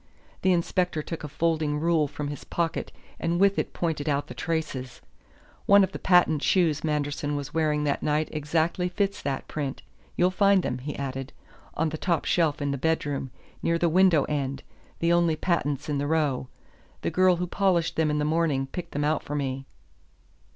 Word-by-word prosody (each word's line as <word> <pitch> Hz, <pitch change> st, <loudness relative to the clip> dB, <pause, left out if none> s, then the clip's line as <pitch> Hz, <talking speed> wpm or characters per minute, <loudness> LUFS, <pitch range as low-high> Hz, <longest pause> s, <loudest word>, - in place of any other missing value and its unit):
The 190 Hz, -, +3 dB
inspector 175 Hz, -2 st, 0 dB
took 165 Hz, +1 st, -6 dB
a -, -, -3 dB
folding 155 Hz, 0 st, 0 dB
rule 160 Hz, -2 st, +2 dB
from 145 Hz, 0 st, -5 dB
his 145 Hz, -, -6 dB
pocket 170 Hz, -1 st, -2 dB, 0.3 s
and 170 Hz, +1 st, 0 dB
with 200 Hz, 0 st, +4 dB
it -, -, -2 dB
pointed 160 Hz, -3 st, -2 dB
out 145 Hz, 0 st, 0 dB
the -, -, -9 dB
traces. 135 Hz, -4 st, -3 dB, 0.7 s
"One 200 Hz, 0 st, +7 dB
of 190 Hz, -, 0 dB
the -, -, -6 dB
patent 175 Hz, -5 st, +4 dB
shoes 165 Hz, -5 st, +2 dB
Manderson 145 Hz, -1 st, -1 dB
was 145 Hz, 0 st, -5 dB
wearing 155 Hz, -2 st, +1 dB
that 145 Hz, -1 st, 0 dB
night 150 Hz, +1 st, +1 dB
exactly 160 Hz, +4 st, 0 dB
fits 195 Hz, +2 st, -1 dB
that 135 Hz, -1 st, -3 dB
print 140 Hz, -3 st, -4 dB, 0.3 s
you'll 180 Hz, +1 st, +3 dB
find 195 Hz, -1 st, +4 dB
them," 125 Hz, -, -2 dB
he 145 Hz, +3 st, -5 dB
added, 135 Hz, 0 st, -5 dB, 0.4 s
"on 160 Hz, +1 st, +1 dB
the 155 Hz, 0 st, -6 dB
top 170 Hz, -3 st, 0 dB
shelf 155 Hz, -4 st, +1 dB
in 140 Hz, -, 0 dB
the 140 Hz, -, -3 dB
bedroom, 145 Hz, -3 st, -1 dB, 0.3 s
near 170 Hz, 0 st, +1 dB
the 170 Hz, 0 st, +2 dB
window 175 Hz, -3 st, +5 dB
end, 140 Hz, -2 st, -3 dB, 0.3 s
the 170 Hz, +1 st, +2 dB
only 170 Hz, -2 st, +3 dB
patents 150 Hz, -5 st, -1 dB
in 145 Hz, -2 st, -1 dB
the 145 Hz, -, -1 dB
row. 150 Hz, -5 st, 0 dB, 0.5 s
The -, -, -1 dB
girl 185 Hz, -1 st, +4 dB
who 180 Hz, +1 st, -2 dB
polished 180 Hz, -2 st, +1 dB
them 160 Hz, -1 st, +2 dB
in 150 Hz, -, 0 dB
the 150 Hz, -, 0 dB
morning 155 Hz, -4 st, +1 dB
picked 175 Hz, +6 st, -7 dB
them 145 Hz, -, -1 dB
out 155 Hz, 0 st, +1 dB
for 145 Hz, -, -5 dB
me." 135 Hz, -1 st, -2 dB
155 Hz, 190 wpm, -26 LUFS, 145-170 Hz, 0.7 s, One